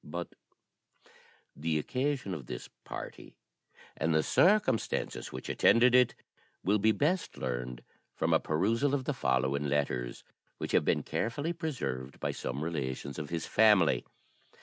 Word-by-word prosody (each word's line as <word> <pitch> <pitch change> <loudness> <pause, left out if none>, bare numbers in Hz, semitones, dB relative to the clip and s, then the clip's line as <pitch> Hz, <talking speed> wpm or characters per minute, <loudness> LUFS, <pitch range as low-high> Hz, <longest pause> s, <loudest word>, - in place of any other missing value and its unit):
But 85 +3 -6 1.2
the 80 +2 -1
occasion 130 - -1
of 70 -8 -7
this - - -6 0.2
party, - - -8 0.6
and 80 0 0
the 80 - +3
circumstances 180 - +2
which 65 - -7
attended 120 +2 +5
it, 125 -2 +5 0.5
will 105 +2 +3
be 110 +2 +4
best 155 - 0
learned 60 -1 -4 0.3
from - - +1
a - - +5
perusal 115 - +1
of 135 - -2
the 150 - 0
following 70 - 0
letters, 70 -4 -1 0.3
which - - -4
have - - +3
been - - +2
carefully 145 +9 -2
preserved 120 - -4
by - - -1
some 65 +4 -4
relations 70 -3 -3
of 75 - -5
his 85 -1 -3
family. 105 -6 +4
85 Hz, 140 wpm, -31 LUFS, -, 1.2 s, attended